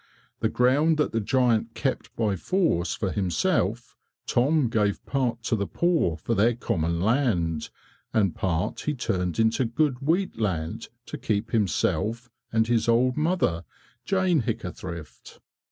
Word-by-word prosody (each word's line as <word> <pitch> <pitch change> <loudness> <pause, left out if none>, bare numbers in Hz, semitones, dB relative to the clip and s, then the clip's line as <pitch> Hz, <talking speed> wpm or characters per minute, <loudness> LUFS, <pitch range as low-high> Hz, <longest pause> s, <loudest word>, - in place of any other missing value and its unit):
The - - +1
ground 145 +6 +3
that 150 - +1
the 115 - 0
giant 115 -1 +1
kept 135 -2 -2
by 105 -4 0
force 160 - 0
for 95 - -2
himself, 105 - 0 0.3
Tom 140 +3 +2
gave 105 -3 0
part 125 -4 -1
to 115 - +1
the 100 -2 -2
poor 165 - +1
for 115 - -2
their 115 +2 +3
common 85 -7 -1
land, 95 - +1 0.4
and 100 -6 +2
part 90 -1 -1
he 150 - -2
turned 90 -8 -2
into 115 +3 +2
good 125 +2 0
wheat 165 - 0
land 85 -7 -2 0.2
to - - -7
keep 110 +1 -1
himself 115 +2 0 0.2
and 110 0 +3
his 115 -1 +1
old 125 +2 +3
mother, 155 - 0 0.4
Jane 185 -5 +2
Hickathrift. 90 -8 -6
115 Hz, 140 wpm, -26 LUFS, 95-130 Hz, 0.4 s, ground